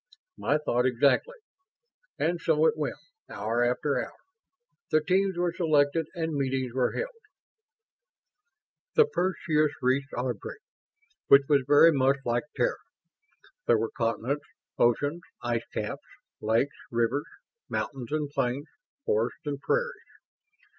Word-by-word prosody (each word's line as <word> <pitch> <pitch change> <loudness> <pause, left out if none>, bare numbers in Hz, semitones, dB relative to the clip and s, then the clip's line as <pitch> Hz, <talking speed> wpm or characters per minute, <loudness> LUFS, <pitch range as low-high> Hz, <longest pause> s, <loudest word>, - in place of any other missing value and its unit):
"My 145 - +1
thought 125 -4 +1
exactly." 140 - +2 0.8
And 170 +1 0
so 160 -1 +3
it 155 -1 +4
went, 155 -2 -2 0.3
hour 115 +4 -1
after 125 +4 +1
hour. - - -11 0.7
The 155 - +4
teams 190 +3 +1
were 175 -1 0
selected 155 -2 +2
and 165 -2 -2
meetings 135 -3 -1
were 130 -1 +1
held. - - -3 1.8
The 460 - +7
Perseus 165 - +1
reached 135 +3 +1
Ardry, 125 - -4 0.7
which 140 0 +8
was 145 -2 +4
very 145 +3 +7
much 135 -1 +3
like 120 +1 0
Terra. - - +1 0.9
There - - +5
were 115 - -2
continents, 120 +4 -1 0.3
oceans, 145 +8 +2 0.2
ice 120 -1 -1
caps, - - -4 0.4
lakes, 115 +6 +1
rivers, 120 +4 0 0.4
mountains 130 -3 -4
and 150 -1 0
plains, 140 -1 -1 0.4
forests 115 +7 -1
and 140 -1 -3
prairies. 485 +1 -1
145 Hz, 120 wpm, -28 LUFS, 125-160 Hz, 1.8 s, which